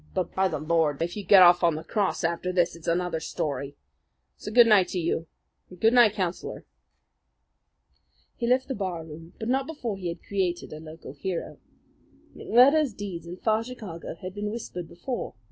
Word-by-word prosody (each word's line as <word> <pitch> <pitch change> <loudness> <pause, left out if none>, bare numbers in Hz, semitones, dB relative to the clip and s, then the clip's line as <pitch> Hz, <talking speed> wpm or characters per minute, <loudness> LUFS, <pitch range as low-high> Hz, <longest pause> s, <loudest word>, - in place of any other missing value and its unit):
"But, 180 - -2
by 190 0 +2
the 160 - -3
Lord! 155 -1 +1
if 170 - -4
you 210 - -5
get 190 -1 +8
off 175 0 +6
after 170 +1 0
this, 175 -2 +1
it's 165 - -12
another 175 -1 0
story! 140 -3 -4 0.6
So 210 - -8
good 240 +1 +7
night 210 -5 +5
to - - -4
you 165 -1 -1 0.4
and 180 - -14
good 225 +4 +4
night, 240 -4 +6
Councillor." 185 -3 -4 1.7
He 235 - -3
left 255 +2 +2
the 270 - -2
bar 185 -7 -4
room; 165 +2 -11
but 220 - -5
not 265 +2 +1
before 245 -10 -4
he 185 -2 -5
had 170 0 -6
created 185 -5 -2
a 155 - -7
local 155 -3 -10
hero. 175 +4 -5 0.8
McMurdo's 270 +1 +4
deeds 180 -5 -6
in 175 +2 -7
far 220 +2 +1
Chicago 215 -11 -8
had 185 0 -5
been 205 +1 -3
whispered 195 -6 -6
before. 240 - -5
180 Hz, 175 wpm, -26 LUFS, 170-215 Hz, 1.7 s, get